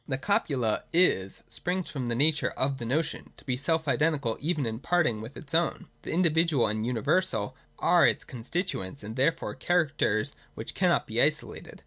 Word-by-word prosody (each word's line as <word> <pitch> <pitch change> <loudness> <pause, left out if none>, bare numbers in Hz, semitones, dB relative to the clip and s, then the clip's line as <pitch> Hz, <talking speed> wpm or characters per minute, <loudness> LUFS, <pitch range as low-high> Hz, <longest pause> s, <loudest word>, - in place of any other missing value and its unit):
The 130 - -1
copula 135 - 0
'is 130 - +2
' - - -33
springs 180 +1 -2
from 130 -4 -3
the 120 - -1
nature 150 +3 +2
of 135 +1 +1
the 120 -3 -5
notion, 155 +5 -2
to - - -17
be 130 -3 0
self 160 +4 0
identical 140 -5 +1
even 155 -2 0
in 110 0 -3
parting 140 -9 +1
with 115 +5 -9
its 145 -1 -9
ovwi. 165 0 +1 0.2
The - - -9
in 180 +3 +2
dividual 160 -5 +3
and 110 +1 -1
universal 115 - 0 0.2
are - - +5
its - - 0
constituents, 125 - -4
and 110 +2 -6
therefore 165 +6 +1
characters 150 -11 0 0.2
which - - -6
cannot - - +2
be - - 0
isolated. - - 0
140 Hz, 180 wpm, -28 LUFS, 115-165 Hz, 0.2 s, are